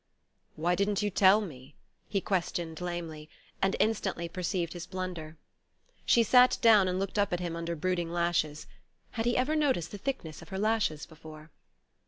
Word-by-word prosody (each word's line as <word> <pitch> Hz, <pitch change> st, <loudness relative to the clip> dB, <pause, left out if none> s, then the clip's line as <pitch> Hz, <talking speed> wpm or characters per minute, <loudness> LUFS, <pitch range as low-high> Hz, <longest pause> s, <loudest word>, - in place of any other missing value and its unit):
"Why 170 Hz, +3 st, +1 dB
didn't 200 Hz, +2 st, 0 dB
you 205 Hz, -, 0 dB
tell 195 Hz, +3 st, +5 dB
me?" 140 Hz, -7 st, -9 dB, 0.3 s
he 195 Hz, -, 0 dB
questioned 175 Hz, -3 st, -2 dB
lamely; 165 Hz, -3 st, -5 dB, 0.3 s
and 195 Hz, 0 st, +2 dB
instantly 195 Hz, -6 st, 0 dB
perceived 175 Hz, -1 st, -2 dB
his 175 Hz, 0 st, -7 dB
blunder. 180 Hz, -4 st, -6 dB, 0.7 s
She 235 Hz, -, +5 dB
sat 250 Hz, +2 st, +5 dB
down, 215 Hz, -5 st, +6 dB
and 180 Hz, 0 st, -1 dB
looked 195 Hz, +2 st, -2 dB
up 200 Hz, -, +2 dB
at 175 Hz, -, 0 dB
him 175 Hz, -2 st, -3 dB
under 170 Hz, 0 st, -3 dB
brooding 175 Hz, +1 st, -1 dB
lashes 170 Hz, -3 st, 0 dB, 0.5 s
had 225 Hz, 0 st, -2 dB
he 240 Hz, -, +2 dB
ever 265 Hz, +5 st, +1 dB
noticed 265 Hz, -, +1 dB
the 205 Hz, -, -7 dB
thickness 190 Hz, -, -4 dB
of 160 Hz, -, -13 dB
her 190 Hz, -, -4 dB
lashes 210 Hz, -7 st, 0 dB
before? 155 Hz, -1 st, -13 dB
180 Hz, 170 wpm, -30 LUFS, 165-205 Hz, 0.7 s, down